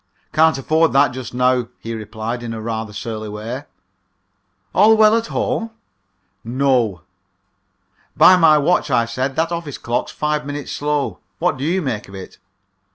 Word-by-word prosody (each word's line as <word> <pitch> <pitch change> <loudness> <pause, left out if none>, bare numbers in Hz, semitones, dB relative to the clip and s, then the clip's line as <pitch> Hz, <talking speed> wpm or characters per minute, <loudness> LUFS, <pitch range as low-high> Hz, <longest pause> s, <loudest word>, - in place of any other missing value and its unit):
"Can't 160 -1 +4
afford 160 +4 +2
that 140 -1 +4
just 125 -2 -7
now," 125 -1 +1
he 115 - -6
replied, 110 +2 -5
in 115 -1 -5
rather 110 0 -4
a - - -12
surly 110 -1 -5
way. 115 +7 -6 1.1
"All 215 +3 +5
well 215 0 +6
at 230 0 -1
home?" 240 -3 -2 0.7
"No." 120 -6 +1 1.2
"By 185 - +8
my 165 -4 +5
watch," 150 +1 +1
I 120 -3 +2
said, 130 +3 -3
"that 165 +2 0
office 170 -5 -4
clock's 120 +1 -2
five 150 0 -1
minutes 145 0 -6
slow. 145 -1 -2 0.2
What 175 -2 +1
do 135 - -6
you 175 +4 0
make 115 -8 -4
it?" 95 -1 -10
135 Hz, 155 wpm, -19 LUFS, 115-160 Hz, 1.2 s, By